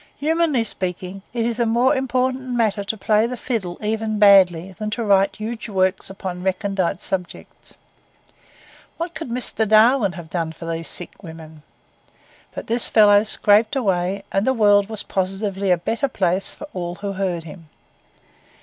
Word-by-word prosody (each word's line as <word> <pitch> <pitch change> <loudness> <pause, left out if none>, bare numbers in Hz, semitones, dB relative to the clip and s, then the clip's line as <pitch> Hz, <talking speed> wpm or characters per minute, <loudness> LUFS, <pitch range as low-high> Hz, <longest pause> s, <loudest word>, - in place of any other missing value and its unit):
Humanly 310 -4 +1
speaking, 185 -2 -5
it 235 -1 -2
is 235 0 -2
a 235 - +2
more 240 +5 +3
important 260 0 -1
matter 215 -3 0
to 220 +2 -3
play 215 +2 +2
the 250 +1 -5
fiddle, 210 -9 -4
even 215 0 -2
badly, 190 -3 +5
than 215 0 -3
to 230 +2 -3
write 195 -1 +3
huge 220 +2 -6
works 190 -1 0
upon 190 -2 -6
recondite 190 -1 -1
subjects. 180 -2 -6 1.2
What 335 +1 -4
could 315 -4 -6
Mr. 235 -2 -1
Darwin 220 -1 +4
have 170 -1 -10
done 165 -2 -2
for 165 - -10
these 165 0 -4
sick 175 - -6
women? 160 -3 -11 0.9
But - - -6
this 235 +1 +2
fellow 205 -2 +6
scraped 215 +2 +3
away; 195 -5 -1
and 195 +4 0
the 260 - +2
world 205 -2 +4
was 220 -2 -4
positively 195 +1 -2
a 180 - +4
better 230 - -1
place 190 -5 -1
for 300 - -10
all 175 -1 -4
who 200 +2 -5
heard 185 -3 -2
him. 165 -1 -12
205 Hz, 160 wpm, -21 LUFS, 185-230 Hz, 1.2 s, fellow